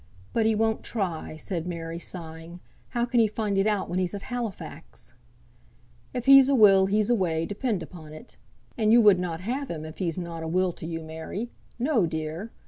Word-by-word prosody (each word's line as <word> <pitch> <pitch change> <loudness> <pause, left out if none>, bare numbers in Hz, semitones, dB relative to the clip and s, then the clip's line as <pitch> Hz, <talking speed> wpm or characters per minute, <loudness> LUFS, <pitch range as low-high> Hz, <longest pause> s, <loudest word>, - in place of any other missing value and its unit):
"But 225 -1 +2
he 220 - +3
won't 220 +1 +1
try," 180 -8 -3
said 170 0 -4
Mary, 165 -1 -5
sighing. 165 0 -7 0.3
"How 240 -2 0
can 240 0 +1
he 225 - +5
find 210 -1 -2
it 195 +2 +2
out 210 -2 0
when 175 +2 -1
he's 185 +2 -1
at 200 - -7
Halifax?" 195 - -7 1.0
"If 245 -2 -4
he's 275 0 +8
a 280 - +4
will 195 -4 +6
he's 210 +3 +2
a - - +5
way, 165 -5 0
depend 205 -1 -2
upon 155 -2 -11
it. 185 +11 -12 0.4
And 215 -1 +3
you 235 - +7
would 205 -5 +6
not 175 -2 -3
have 255 +7 -3
him 155 -2 -5
if 155 0 -10
he's 175 -2 -1
not 170 -2 -5
a 160 - -4
will 185 +2 +1
to 160 - -8
you, 165 -1 -4
Mary! 160 +9 -6 0.3
No, 245 - +2
dear!" 160 +6 -4
190 Hz, 205 wpm, -26 LUFS, 165-225 Hz, 1.0 s, he's